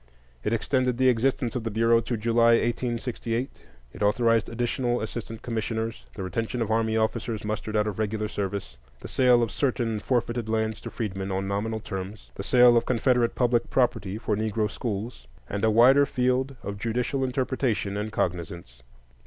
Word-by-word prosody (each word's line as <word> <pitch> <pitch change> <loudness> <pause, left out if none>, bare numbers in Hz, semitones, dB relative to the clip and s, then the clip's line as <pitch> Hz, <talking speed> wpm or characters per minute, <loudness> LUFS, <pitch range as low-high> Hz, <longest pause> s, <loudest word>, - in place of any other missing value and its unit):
It - - -1
extended 125 +2 +1
the 130 0 +4
existence 125 +1 +1
of 125 - -2
the 115 - -2
Bureau 115 +2 +3
to 120 +1 -3
July, 115 +1 +4
1868; 120 +1 -2 0.3
it - - -11
authorized 115 +2 +2
additional 120 +1 -1
assistant 110 +1 -6
commissioners, 115 -1 -3
the 95 - -5
retention 115 +6 -3
of 110 -2 -1
army 110 0 +1
officers 110 0 -1
mustered 110 0 -3
out 105 0 +3
of 105 -1 -4
regular 110 0 -1
service, 100 -2 -4 0.2
the - - -7
sale 125 -2 +4
of 115 - -2
certain 120 -5 0
forfeited 120 -1 -1
lands 110 -1 -1
to - - -6
freedmen 95 -3 -4
on 95 +1 -2
nominal 110 +3 -2
terms, 100 0 -7
the - - -6
sale 125 +3 +6
of 115 - +1
Confederate 125 -1 +2
public 120 -2 +1
property 105 -6 0
for 110 -1 -1
Negro 110 0 -1
schools, 115 0 -5 0.2
and 100 0 -4
a 110 - +5
wider 130 +6 +6
field 130 +2 0
of 100 0 -5
judicial 125 +5 -1
interpretation 130 -5 -1
and 105 +1 -3
cognizance. 85 - -3
115 Hz, 170 wpm, -26 LUFS, 105-120 Hz, 0.3 s, sale